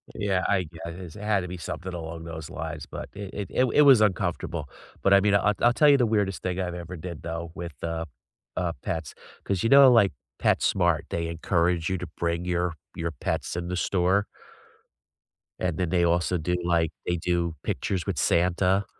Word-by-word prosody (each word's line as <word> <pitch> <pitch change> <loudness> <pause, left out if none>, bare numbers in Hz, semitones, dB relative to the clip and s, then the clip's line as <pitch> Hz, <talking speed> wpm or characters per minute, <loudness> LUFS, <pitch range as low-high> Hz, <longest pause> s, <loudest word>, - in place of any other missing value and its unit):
Yeah, 95 -2 0
I 95 - +2
guess 85 +1 -9
it 105 - -9
had 105 -2 +1
to 90 - -5
be 90 +1 -6
something 90 +2 -6
along 80 -1 -6
those 80 -2 -7
lines, 80 -2 -5
but - - -7
it 100 -1 -7
it 100 -1 -4
it 130 - +3
it 130 +4 +3
was 135 -6 +7
uncomfortable. 90 -6 0 0.4
But 100 - +5
I 100 - +8
mean, 100 0 +3
I'll 105 +1 +3
I'll 120 0 +5
tell 150 +3 +5
you 140 - +7
the 125 - +3
weirdest 105 -3 0
thing 90 0 -2
I've 90 -1 -2
ever 90 +1 -7
did 85 -1 -7
though 85 0 -5
with 85 -2 -6
the, 80 0 -3 0.5
uh, 90 -2 0
pets, 80 -2 -3 0.3
'cause, 100 -1 -1
you 115 - +2
know, 140 -1 +9
like, 110 -5 +5 0.3
PetSmart, 85 -4 +2
they 85 0 -2
encourage 85 +1 0
you 95 - 0
to 90 - -5
bring 85 0 -1
your 90 -1 0 0.2
your 85 0 -2
pets 75 +3 -3
in 85 0 -3
the 90 - -2
store. 95 +2 +2 1.3
And 90 -3 -1
then 90 -3 0
they 90 -1 +2
also 85 +1 +1
do, 90 +3 -1
like, 85 -2 +2
they 85 - 0
do 85 -1 -1
pictures 90 -5 -2
with - - -2
Santa. 90 +3 +2
90 Hz, 200 wpm, -26 LUFS, 85-100 Hz, 1.3 s, know